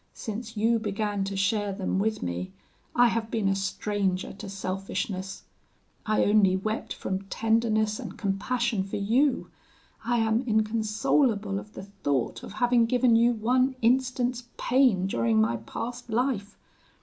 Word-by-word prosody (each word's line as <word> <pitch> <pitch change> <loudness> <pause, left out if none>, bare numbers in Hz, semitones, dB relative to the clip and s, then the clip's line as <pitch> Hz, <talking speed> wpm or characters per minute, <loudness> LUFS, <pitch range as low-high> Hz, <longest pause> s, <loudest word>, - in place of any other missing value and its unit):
Since 225 0 -6
you 225 +2 +3
began 205 -1 -2
to 195 0 -4
share 205 +1 +1
them 190 0 -1
with 215 +2 -1
me, 90 +1 -3 0.4
I 245 0 +6
have 225 -1 -2
been 220 -3 0
a 195 - +2
stranger 195 -1 -1
to 195 - -8
selfishness: 195 +1 -4 0.6
I 215 - +3
only 205 -3 +4
wept 215 +3 -3
from 190 +1 -3
tenderness 220 +1 +1
and - - -7
compassion 220 +2 -1
for 195 - -6
you. 240 +7 +1 0.5
I 240 +1 +1
am 225 0 +2
inconsolable 215 0 +1
at 210 +1 -13
the - - -7
thought 165 -11 -2
of - - -9
having 240 +1 +3
given 245 -1 +3
you 235 +1 +4
one 255 +4 +1
instant's 250 0 +1
pain 245 -8 +3
during 115 - +1
my 115 +2 +2
past 240 - -6
life. 225 -3 -1
215 Hz, 145 wpm, -27 LUFS, 195-235 Hz, 0.6 s, I